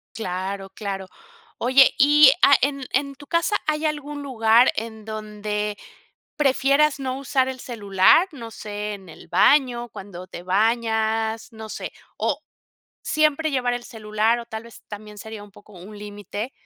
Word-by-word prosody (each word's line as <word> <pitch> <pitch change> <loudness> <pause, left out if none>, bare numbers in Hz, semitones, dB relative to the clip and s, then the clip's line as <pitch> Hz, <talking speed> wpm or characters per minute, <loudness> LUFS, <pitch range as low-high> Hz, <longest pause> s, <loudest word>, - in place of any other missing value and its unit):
Claro, 195 -1 -4
claro, 195 -1 -5 0.5
oye, 260 +2 +5
y, 290 0 +7
ah, 280 - +7
en 275 -1 0
en 275 +1 0
tu 285 +1 -14
casa, 340 +5 +1
¿hay 305 0 0
algún 295 -1 -3
lugar 235 -2 +4
en 220 0 -5
donde 210 -1 -4 0.6
prefieras 280 +1 +3
no 260 -1 -3
usar 265 -1 0
el 260 -1 -5
celular?, 205 - +3
no 230 -4 -8
sé, 210 -1 -5
en 195 -2 -14
el 160 - -14
baño, 240 +4 +3
cuando 185 -4 -10
te 175 -2 -9
bañas, 220 +3 0
no 220 0 -9
sé, - - -6 0.2
o - - -1 0.6
siempre 310 0 +1
llevar 250 -3 0
el 245 0 -4
celular 215 +1 0
o 235 - -6
tal 220 -1 -7
vez 230 -2 -14
también 210 0 -10
sería 220 0 -8
un 205 - -14
poco 205 +1 -18
un 195 +4 -11
límite, 205 +3 -6
225 Hz, 155 wpm, -23 LUFS, 210-270 Hz, 0.6 s, y